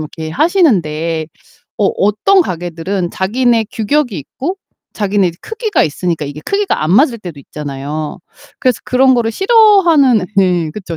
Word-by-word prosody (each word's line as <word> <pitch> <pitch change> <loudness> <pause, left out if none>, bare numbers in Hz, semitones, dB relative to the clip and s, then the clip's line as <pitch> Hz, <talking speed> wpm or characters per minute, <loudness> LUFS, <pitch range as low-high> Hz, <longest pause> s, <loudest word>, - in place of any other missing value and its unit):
이렇게 155 +1 -6
하시는데 165 - +1 0.5
어 210 - +2
어떤 215 - +3
가게들은 175 - -4
자기네 230 +3 +1
규격이 240 - -1
있고 275 - -5 0.4
자기네 200 -3 +1
크기가 445 -1 -1
있으니까 165 +1 -2
이게 145 +1 -7
크기가 400 - -1
안 155 - -1
맞을 235 - +3
때도 175 -8 -9
있잖아요. 150 +1 -6 0.4
그래서 255 -5 0
그런 260 +1 +3
거를 235 -2 0
싫어하는 355 - +4
네 180 -4 +2
그쵸. 170 -3 -7
200 Hz, 330 characters per minute, -15 LUFS, 165-270 Hz, 0.5 s, 싫어하는